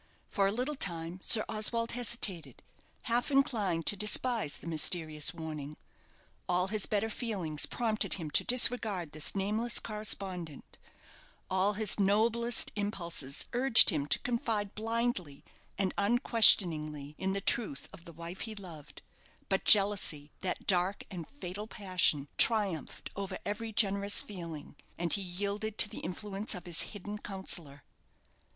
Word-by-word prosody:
For 195 -2 +1
a - - 0
little 250 +7 -2
time 170 - -4
Sir 215 +1 +5
Oswald 230 +2 -1
hesitated, 205 - 0 0.4
half 240 +1 -1
inclined 220 - 0
to - - +2
despise 210 - +1
the - - -14
mysterious 155 -1 0
warning. 155 -3 -8 0.7
All 180 +1 0
his 215 -1 -1
better 210 +1 -1
feelings 195 -10 -3
prompted 220 -4 -1
him 160 -5 -6
to - - +3
disregard 220 -9 +2
this 155 +4 -2
nameless 215 +5 0
correspondent 190 -7 -4 0.7
all 190 +2 +1
his 210 0 +1
noblest 225 +4 +3
impulses 170 -9 -1
urged 245 -1 +7
him 145 -3 -3
to - - +3
confide 225 -4 -3
blindly 225 -9 -3 0.3
and 190 -2 -1
unquestioningly 175 - +3
in 190 0 -2
the 200 - -2
truth 195 -7 +1
of 180 -2 -14
the 170 - -12
wife 170 +3 -9
he 220 -1 -6
loved; 160 -7 -12 0.5
but 195 -1 -1
jealousy 195 -8 +3
that 185 - -4
dark 185 +1 +1
and 175 -4 -8
fatal 205 -5 -8
passion 185 -9 +1
triumphed 205 - +2
over 195 -1 -5
every 220 +2 -4
generous 200 -1 +2
feeling, 170 -7 -9 0.2
and 170 -1 +1
he 200 - 0
yielded 200 +4 -4
to - - +8
the - - -9
influence 200 +3 -4
of 180 - -8
his 175 -2 +2
hidden 205 0 -7
counsellor. 175 -8 -6
195 Hz, 140 wpm, -30 LUFS, 170-220 Hz, 0.7 s, to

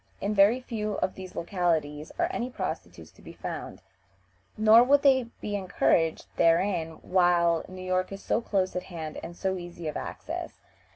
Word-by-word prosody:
In 205 +2 -1
very 210 +5 +5
few 215 -4 -3
of 185 - -1
these 185 -1 -10
localities 160 -4 -1
are 345 0 +2
any 250 -8 -2
prostitutes 90 - -6
to - - -21
be - - -11
found, - - -7 0.7
nor 220 +2 +7
would 280 +3 +4
they 260 -3 +5 0.2
be 205 - -3
encouraged 180 -4 +1
therein 170 -1 +2
while 175 -2 +3
New 185 0 -8
York 185 0 0
is 195 0 -8
so 230 - +1
close 190 -5 -1
at 180 - -1
hand 160 -3 -6
and 175 - -8
so 190 -1 -1
easy 175 -2 -7
of 150 - -4
access. - - -5
185 Hz, 170 wpm, -28 LUFS, 170-210 Hz, 0.7 s, nor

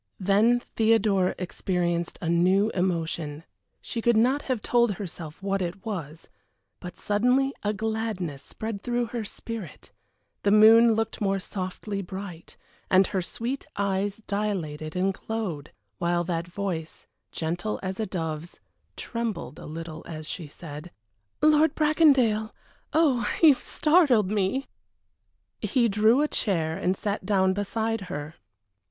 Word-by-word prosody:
Then 215 +6 +3
Theodora 215 -4 +3
experienced 175 -2 -2
a - - -1
new 185 +5 +3
emotion; 165 -4 -2 0.4
she 230 - -4
could 235 -1 +3
not 255 +6 +3
have 255 -4 -2
told 240 -3 +3
herself 175 -3 -8
what 195 0 0
it 185 +3 -4
was, 165 -7 -5 0.5
but 180 - -9
suddenly 250 +6 +2
a 205 - 0
gladness 215 -8 -3
spread 220 -2 -6
through 240 +1 0
her 235 -2 -2
spirit; 220 -1 -8 0.5
the 205 - +2
moon 220 +2 +7
looked 225 0 -2
more 195 -1 +1
softly 195 +1 -4
bright, 190 -2 -8 0.3
and 190 +1 +6
her 190 - -1
sweet 240 +9 -4
eyes 200 +1 -1
dilated 175 -7 -3
and 190 +2 +1
glowed, 190 -9 -4 0.3
while 175 0 +1
that 170 -1 -2
voice, 175 -4 -4 0.3
gentle 175 +6 -2
as 190 +1 -4
a 220 - -1
dove's, 165 -2 -5 0.4
trembled 230 -4 -4
a - - -9
little 160 0 -7
as 155 -2 -7
she 165 -1 -6
said: 150 +2 -9 0.5
"Lord 310 0 +5
Bracondale! 275 -9 +4 0.4
Oh, 280 -7 +3
you 310 -3 +10
startled 275 - +3
me!" 210 +6 0 1.0
He 245 -4 +2
drew 220 +6 +4
a - - +2
chair 165 - 0
and 185 0 0
sat 205 -1 -2
down 190 -2 +2
behind 220 +2 -1
her. 145 +2 -5
200 Hz, 135 wpm, -26 LUFS, 175-225 Hz, 1.0 s, you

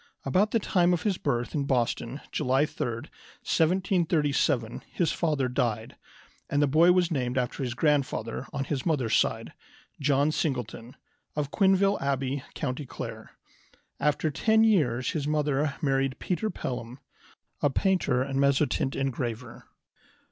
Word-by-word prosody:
About 185 +10 +2
the 230 - +2
time 180 -4 +2
of 175 - -1
his 200 -4 0
birth 120 -4 -1
in 145 -2 -1
Boston, 125 0 -1
July 135 0 +2
3, - - -5
1737, 155 - 0
his 170 - +1
father 150 -6 0
died, 120 -3 -2 0.5
and 145 - +1
the 145 - +5
boy 160 +5 +5
was 180 -1 +2
named 125 -4 -1
after 125 +2 -1
his 125 -3 -2
grandfather 135 -5 0
on 140 -2 -2
his 135 -1 -3
mother's 135 -9 +1
side, - - 0 0.5
John 140 +1 +2
Singleton 125 -5 -3 0.4
of 145 -2 -2
Quinville 195 0 +3
Abbey, 135 0 -1
County 140 -1 -3
Clare. - - -7 0.7
After 150 +2 +1
ten 220 +9 +3
years 140 - +2
his 150 -3 -2
mother 150 -1 0
married 135 -2 +1
Peter 185 +4 -2
Pelham, 125 - -5 0.6
a 145 - +3
painter 140 -6 +1
and 135 0 -2
mezzotint 140 -1 +2
engraver. 125 -3 -4
140 Hz, 135 wpm, -27 LUFS, 130-160 Hz, 0.7 s, the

